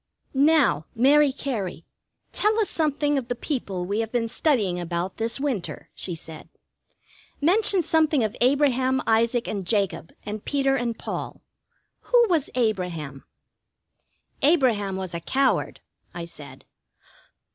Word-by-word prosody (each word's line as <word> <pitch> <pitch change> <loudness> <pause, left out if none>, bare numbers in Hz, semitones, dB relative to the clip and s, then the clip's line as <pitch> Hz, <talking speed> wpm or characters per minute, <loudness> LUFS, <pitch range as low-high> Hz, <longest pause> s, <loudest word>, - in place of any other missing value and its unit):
"Now, 280 - +3
Mary 280 +4 +5
Cary, 215 - -4 0.5
tell 430 +2 +1
us 430 - 0
something 295 -2 +1
of 245 - -8
the 245 - -2
people 200 - -3
we 200 +4 -1
have 225 -1 -2
been 235 -2 0
studying 225 - +1
about 175 +2 -3
this 230 +3 -2
winter," 265 -10 -3
she 175 - -5
said, 160 -1 -10 0.9
"Mention 380 +3 +3
something 315 -4 +2
of 215 +1 -2
Abraham, 260 -1 +2
Isaac, 230 +2 +2
and 200 -3 -3
Jacob, 190 -4 -1
and 210 0 -5
Peter 275 -1 +1
and 240 -3 -2
Paul. - - -6 0.7
Who 485 -1 +6
was 325 -6 +1
Abraham?" 180 - -2 1.2
"Abraham 245 - +3
was 190 -2 -5
a 170 - -3
coward," 265 +10 0 0.3
I 170 -1 -5
said. 140 -5 -12
235 Hz, 130 wpm, -25 LUFS, 190-285 Hz, 1.2 s, Who